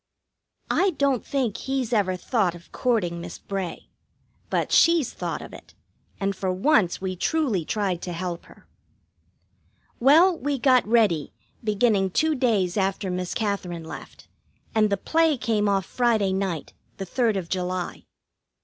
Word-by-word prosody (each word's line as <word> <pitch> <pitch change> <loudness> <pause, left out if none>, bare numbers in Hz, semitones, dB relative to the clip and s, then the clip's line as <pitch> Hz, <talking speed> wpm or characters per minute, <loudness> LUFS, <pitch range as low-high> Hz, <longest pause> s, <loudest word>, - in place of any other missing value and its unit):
I 390 - +3
don't 275 -4 +1
think 255 -7 -1
he's 265 -3 -2
ever 195 -4 +2
thought 185 -1 0
of 170 +1 -15
courting 180 -9 0
Miss 170 -1 -7
Bray. 195 -3 -5 0.6
But - - -1
she's 335 -6 +4
thought - - -4
of - - -11
it, - - -13 0.4
and 195 -1 -1
for 185 0 -1
once 190 - +2
we 185 -1 -3
truly 235 - 0
tried 190 -4 -1
to 180 - -5
help 175 0 -4
her. - - -18 1.3
Well, 325 +9 +6
we 285 +1 -1
got 255 -3 +4
ready, 210 -10 +2 0.3
beginning 210 -2 +2
two 315 - +1
days 220 -9 +1
after 195 -1 0
Miss 180 0 -3
Katherine 190 -6 -2
left, - - -10 0.5
and 215 -1 +3
the 200 - +1
play 320 +6 +2
came 215 -3 +1
off 195 -2 +1
Friday 220 -5 +1
night, 190 -5 -3 0.2
the 195 - -4
third 225 +2 +1
of 180 -3 -4
July. 180 0 -3
200 Hz, 150 wpm, -25 LUFS, 185-245 Hz, 1.3 s, Well